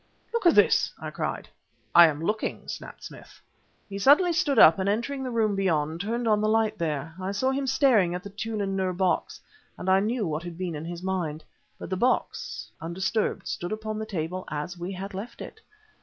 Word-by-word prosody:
"Look 465 -6 +2
at 340 - +5
this!" - - +4
I - - -6
cried. - - -4 0.5
"I 170 -1 +9
am 155 0 -3
looking," 210 +5 -2
snapped - - -8
Smith. - - -12 0.5
He 200 -1 -6
suddenly 300 - +5
stood 290 -5 +1
up, 165 -4 +8
and 190 +1 +1
entering 240 +6 -1
the 260 - -3
room 220 -4 +1
beyond, 165 -4 0
turned 230 +3 -2
on 210 -1 +3
the 215 - +1
light 220 -1 +1
there. 160 -1 -2
I 190 +1 -2
saw 260 +7 0
him 270 0 -2
staring 250 -10 +3
at 180 - -5
the 200 - -8
Tûlun 205 -1 -3
Nûr 185 -2 -1
box, 185 -3 0 0.4
and 180 - -7
I 190 +1 +5
knew 220 +2 0
what 155 -1 -2
had 170 -1 -8
been 180 -2 -3
in 150 +1 -6
his 170 +1 -6
mind. 170 -5 -2 0.3
But - - -8
the 185 - 0
box, 250 +6 -1
undisturbed, 190 +6 -1
stood 175 - -4
upon 215 0 -4
the 220 - -4
table 180 -2 -3
as 150 +4 -4
we 175 +2 -5
had 195 +2 -6
left 200 +6 -7
it. 440 - -9
195 Hz, 205 wpm, -26 LUFS, 175-220 Hz, 0.5 s, I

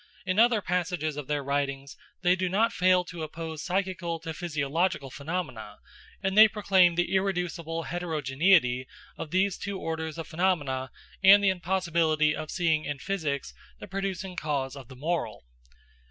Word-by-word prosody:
In 185 +2 0
other 230 -3 +4
passages 175 -4 -1
of 145 -2 -6
their 145 -1 -1
writings 140 0 -2 0.3
they 180 0 +4
do 185 -1 -1
not 220 +5 +2
fail 180 0 +3
to 175 -1 -8
oppose 160 0 -6
psychical 185 -2 -2
to 160 - -5
physiological 155 -2 -1
phenomena, 140 -9 -5 0.5
and 190 0 0
they 215 +1 +10
proclaim 195 -5 +3
the 175 +2 0
irreducible 180 -4 -1
heterogeneity 155 -5 +1 0.3
of 155 - -6
these 190 +3 +1
two 200 -1 -4
orders 160 -2 -4
of 165 - -6
phenomena 150 -7 0 0.3
and 200 +1 +8
the 195 - +5
impossibility 170 -4 +1
of 155 0 -6
seeing 160 -4 +1
in 145 -1 -4
physics 145 -3 -3 0.3
the - - -9
producing 195 -1 -4
cause 140 -5 -2
of 135 -4 -10
the 130 - -12
moral. 160 - -3
170 Hz, 155 wpm, -28 LUFS, 150-185 Hz, 0.5 s, they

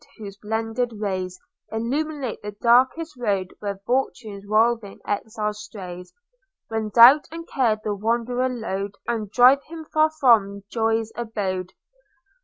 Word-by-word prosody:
whose 200 -3 -8
blended 225 +3 -2
rays 185 -3 -3 0.3
Illuminate 270 +3 -3
the 210 0 -6
darkest 255 +9 +2
road 195 -6 -1
Where 200 -1 -4
fortune's 220 -5 -2
roving 220 -1 +1
exile 210 0 -2
strays, 180 -4 -9 0.6
When 220 -1 -2
doubt 245 +7 +8
and 330 +1 -8
care 230 -5 +1
the 210 - -1
wanderer 235 +4 0
load, 200 -5 -4
And 225 -4 -2
drive 250 +6 +6
him 320 0 -9
far 310 0 +2
from 225 -10 +3
joy's 225 -1 0
abode. 195 -6 -3
225 Hz, 125 wpm, -23 LUFS, 205-245 Hz, 0.6 s, doubt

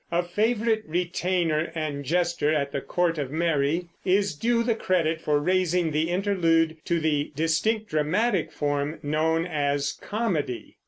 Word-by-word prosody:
a 175 +1 +1
favorite 220 +4 0
retainer 175 -1 0
and 150 -3 -3
jester 170 -1 +1
at 140 -2 0
the 140 - -2
court 170 -3 0
of 140 -3 -2
Mary, 160 +1 0 0.2
is 195 0 +2
due 230 +7 +1
the 235 0 +2
credit 165 -7 0
for 150 -2 +1
raising 180 0 +1
the 155 +2 0
Interlude 170 -4 +2
to 170 -1 0
the 150 -2 0
distinct 185 +8 0
dramatic 175 +6 +1
form 145 +1 -2
known 160 +3 +1
as 145 -4 -1
comedy. 190 - -2
165 Hz, 145 wpm, -26 LUFS, 150-185 Hz, 0.2 s, is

